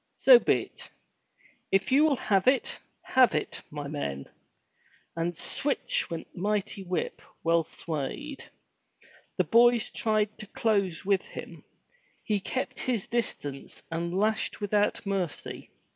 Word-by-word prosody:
so - - +8
be*t! - - -1 0.8
If 195 +5 +2
you 280 +3 +6
will 300 -3 +3
have 195 -5 +1
it, 260 0 +2 0.2
have 255 - +4
it, 150 - -2
my 145 -1 -6
men!*' 70 - -4 0.9
And 170 0 -2
sweetch 285 +10 0
went 165 -1 -5
the 175 - -8
mighty 210 0 -1
whip, 180 -1 -3 0.2
well 165 0 +4
swayed. 165 - -5 0.9
The - - +4
boys 235 0 +4
tried 215 -1 0
to 215 - -8
close 200 -6 0
with 195 -1 +3
him. - - -10 0.6
He 210 -2 0
kept 255 +6 -3
his 235 -6 -1
distance 145 - -4
and 170 +1 -2
lashed 215 +2 0
without 205 0 +1
mercy. 190 -5 -3
200 Hz, 130 wpm, -28 LUFS, 170-230 Hz, 0.9 s, so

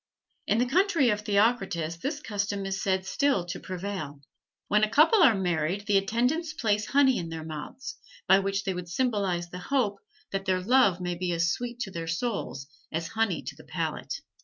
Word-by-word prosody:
In - - +3
the 245 - +3
country 330 - +3
of 210 0 -1
Theocritus 200 -6 +1
this 280 - -3
custom 200 -4 -2
is 195 0 -2
said 190 -1 0
still 270 -4 +1
to 175 - -5
prevail: 185 -6 -5 0.5
when 210 +1 +3
a 215 - +3
couple 335 - +5
are 265 -10 +7
married 180 +1 -1
the 200 -2 +4
attendants 250 - 0
place 215 -6 0
honey 265 -1 +4
in 170 -2 -5
their 165 -1 -6
mouths, 255 - -7 0.3
by 190 +1 +7
which 195 +1 -1
they 190 - -1
would 180 -1 -6
symbolize 190 -5 0
the 180 - -6
hope 210 -2 0 0.3
that 195 0 -2
their 185 -1 +2
love 200 -3 +3
may 180 0 -1
be 175 +1 -2
as 165 0 +2
sweet 245 +3 -4
to 195 - -3
their 165 -2 -5
souls 165 - -3 0.3
as 165 +1 -3
honey 225 -5 0
to - - -6
the - - -14
palate. - - -4
200 Hz, 190 wpm, -28 LUFS, 180-245 Hz, 0.5 s, are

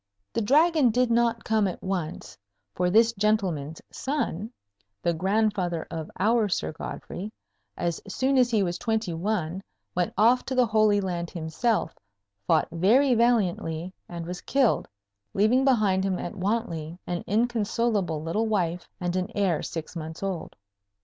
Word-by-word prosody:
The - - 0
Dragon 300 +4 +4
did 245 +1 +2
not 235 0 +2
come 215 -2 +2
at 180 - -4
once, 180 -3 -4 0.4
for 180 0 +1
this 225 +4 +5
gentleman's 190 -8 0
son, 230 - -2 0.5
the 170 - +2
grandfather 190 -2 0
of 160 -1 -5
our 215 +2 +3
Sir 175 - -1
Godfrey, 185 +5 -6 0.5
as 170 -2 -2
soon 265 +6 +1
as 250 -1 +4
he 220 -4 +2
was 175 -1 -2
twenty 220 -5 -1
one, 180 0 -2 0.3
went 180 -1 0
off 235 +5 +5
to 265 - -3
the 250 -1 +5
Holy 215 -2 +3
Land 175 -3 -3
himself, 170 +5 -1 0.5
fought 160 - +3
very 235 +11 +4
valiantly, 185 -7 +1 0.2
and 170 -1 -6
was 180 +1 -6
killed, 270 -4 +2 0.5
leaving 220 +6 +4
behind 215 -8 +3
him 190 -2 0
at 175 - -5
Wantley 180 -5 -2
an 175 -1 -3
inconsolable 215 -6 0
little 210 +8 0
wife 180 -5 -1
and 175 0 -2
an 185 +2 -1
heir 190 -6 +1
six 165 +1 -6
months 160 +2 -6
old. 190 -4 -4
200 Hz, 150 wpm, -26 LUFS, 175-230 Hz, 0.5 s, this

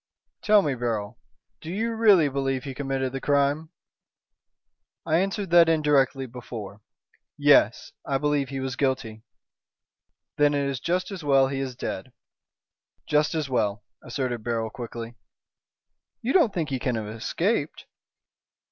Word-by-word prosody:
"Tell 210 -1 +5
me, 145 - 0
Beryl, 115 -4 -3 0.4
do 160 - -8
you 225 +6 -1
really 205 -8 +5
believe 135 -1 -1
he 135 -2 -6
committed 135 -1 -2
the 135 - -4
crime?" 145 +2 +1 1.4
"I 160 0 +2
answered 195 -1 -2
that 170 -1 +7
indirectly 145 -4 +2
before. 115 -4 -8 0.6
Yes, - - +4
I 135 - 0
believe 145 -1 0
he 135 -1 -4
was 130 -1 -3
guilty." 130 -6 -1 1.2
"Then 145 -1 +3
it 140 -1 0
is 135 -2 -3
just 180 +7 -1
as 185 -4 -6
well 135 -2 +4
he 135 0 -3
is 130 -2 -4
dead." - - -5 0.9
"Just 150 +2 +1
as 155 -3 -1
well," 105 -5 -1 0.2
asserted 120 -2 -3
Beryl, 115 -1 -2
quickly. 115 -1 -7 1.1
"You 245 - 0
don't 330 - +4
think 165 -5 -2
he 130 - -1
can 125 -1 -1
have 110 -1 -3
escaped?" 110 +2 -2
135 Hz, 140 wpm, -25 LUFS, 125-155 Hz, 1.4 s, that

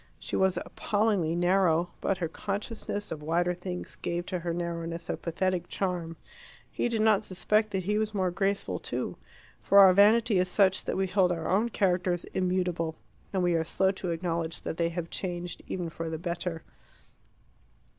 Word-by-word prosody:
She - - -5
was 190 -1 +2
appallingly 205 -6 0
narrow, 175 -1 +2
but 195 - 0
her 175 -2 -1
consciousness 205 +3 -4
of 155 - -5
wider 170 +3 +1
things 180 0 -6
gave 175 0 -3
to 180 -1 -3
her 170 0 -3
narrowness 170 0 -3
a - - -1
pathetic 175 +1 -1
charm. 175 -4 -3 0.5
He - - -1
did 225 -2 +1
not 220 -1 +4
suspect 210 +3 +1
that 190 -2 -2
he 210 +3 +1
was 215 0 0
more 190 -3 0
graceful 195 +2 -1
too. - - -3 0.5
For 200 - +3
our 190 -2 +9
vanity 215 +1 +5
is 180 0 +1
such 190 0 +3
that - - -2
we 190 - +2
hold 185 -1 +2
our 165 -2 -2
own 215 +5 +2
characters 180 -4 +1
immutable, 180 -3 0 0.4
and 190 -2 0
we 175 -1 +3
are 165 -1 +2
slow 190 +4 +2
to 190 -2 -5
acknowledge 165 -1 -2
that 160 - -4
they 170 -1 +1
have 170 0 -5
changed, 175 -2 -4
even 180 -2 -3
for 165 0 -5
the 160 - -3
better. 170 0 -4
180 Hz, 175 wpm, -29 LUFS, 170-195 Hz, 0.5 s, our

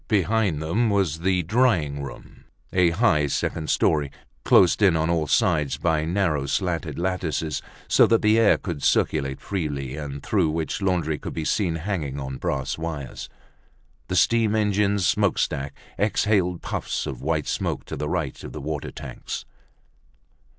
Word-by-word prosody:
Behind 100 -5 +1
them 110 +9 +1
was 95 -7 +1
the 90 +1 +1
drying 85 - +1
room, 70 -3 -10 0.3
a 90 -2 +4
high 85 -5 +2
second 80 +3 -2
story, 75 -3 +2 0.3
closed 90 +3 +5
in 95 -5 +5
on 80 +1 +1
all 80 -3 0
sides 75 - +2
by 80 0 +1
narrow 80 -6 0
slatted 85 -2 -1
lattices 85 -4 -2 0.3
so - - +5
that 115 -1 +2
the 110 +1 +5
air 115 - +5
could 85 -7 -5
circulate 70 -3 +1
freely, 70 -8 -3
and 70 -2 -6
through 95 -7 +1
which 80 +4 -2
laundry 85 -5 0
could - - -7
be 80 - -3
seen 90 -4 +1
hanging 80 -5 -3
on 65 -1 -5
brass 65 +3 -2
wires. 80 -5 -5 0.8
The - - -2
steam 115 -2 +3
engine's 100 -2 +2
smokestack 70 -4 0 0.2
exhaled 100 -4 +1
puffs - - -3
of 65 - -6
white 75 +1 0
smoke - - -2
to - - -6
the - - -3
right - - -3
of - - -8
the - - -6
water 75 0 -4
tanks. - - -7
80 Hz, 155 wpm, -24 LUFS, 75-100 Hz, 0.8 s, closed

